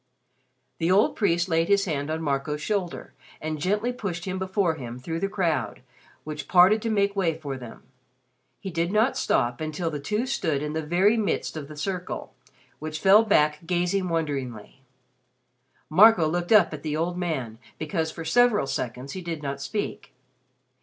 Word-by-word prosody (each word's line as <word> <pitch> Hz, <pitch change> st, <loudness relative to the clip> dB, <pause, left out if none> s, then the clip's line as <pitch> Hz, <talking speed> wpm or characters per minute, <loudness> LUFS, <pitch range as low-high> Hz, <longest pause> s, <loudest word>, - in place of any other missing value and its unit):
The 165 Hz, -, +1 dB
old 195 Hz, +4 st, +4 dB
priest 175 Hz, -4 st, +1 dB
laid 165 Hz, -1 st, +1 dB
his 200 Hz, -1 st, +3 dB
hand 145 Hz, -4 st, -2 dB
on 160 Hz, +1 st, -2 dB
Marco's 145 Hz, +1 st, -1 dB
shoulder, 185 Hz, +1 st, -3 dB, 0.3 s
and 155 Hz, 0 st, -4 dB
gently 210 Hz, +8 st, 0 dB
pushed 175 Hz, -8 st, -4 dB
him 190 Hz, -1 st, -3 dB
before 190 Hz, -2 st, 0 dB
him 125 Hz, -6 st, -7 dB
through 165 Hz, +6 st, -4 dB
the 195 Hz, -, -1 dB
crowd 165 Hz, -, -1 dB, 0.4 s
which 150 Hz, -1 st, -6 dB
parted 190 Hz, +4 st, +6 dB
to 230 Hz, -, -2 dB
make 200 Hz, -2 st, +1 dB
way 170 Hz, -5 st, 0 dB
for 145 Hz, -4 st, -5 dB
them. 120 Hz, -3 st, -10 dB, 0.8 s
He 190 Hz, -, -6 dB
did 170 Hz, +1 st, -1 dB
not 220 Hz, +5 st, +2 dB
stop 120 Hz, -, 0 dB
until 155 Hz, +2 st, -2 dB
the 150 Hz, -, -4 dB
two 210 Hz, -, -1 dB
stood 160 Hz, -, -1 dB
in 150 Hz, 0 st, -3 dB
the 160 Hz, -, -1 dB
very 185 Hz, +8 st, +3 dB
midst 210 Hz, -6 st, -1 dB
of 150 Hz, -3 st, -6 dB
the 150 Hz, 0 st, -11 dB
circle, 180 Hz, +3 st, -4 dB, 0.5 s
which 155 Hz, 0 st, -5 dB
fell 200 Hz, +5 st, +6 dB
back 150 Hz, -8 st, +3 dB
gazing 180 Hz, +1 st, 0 dB
wonderingly. 135 Hz, -8 st, -3 dB, 1.1 s
Marco 185 Hz, 0 st, +6 dB
looked 175 Hz, +4 st, -2 dB
up 205 Hz, -7 st, +6 dB
at 150 Hz, -, -6 dB
the 155 Hz, 0 st, -2 dB
old 170 Hz, +2 st, -1 dB
man 140 Hz, -11 st, -3 dB, 0.2 s
because 160 Hz, +1 st, -2 dB
for 165 Hz, 0 st, -7 dB
several 235 Hz, -, +3 dB
seconds 135 Hz, 0 st, -4 dB
he 185 Hz, -, -5 dB
did 165 Hz, -3 st, -5 dB
not 140 Hz, 0 st, -4 dB
speak. 205 Hz, +8 st, -4 dB
165 Hz, 175 wpm, -25 LUFS, 150-195 Hz, 1.1 s, parted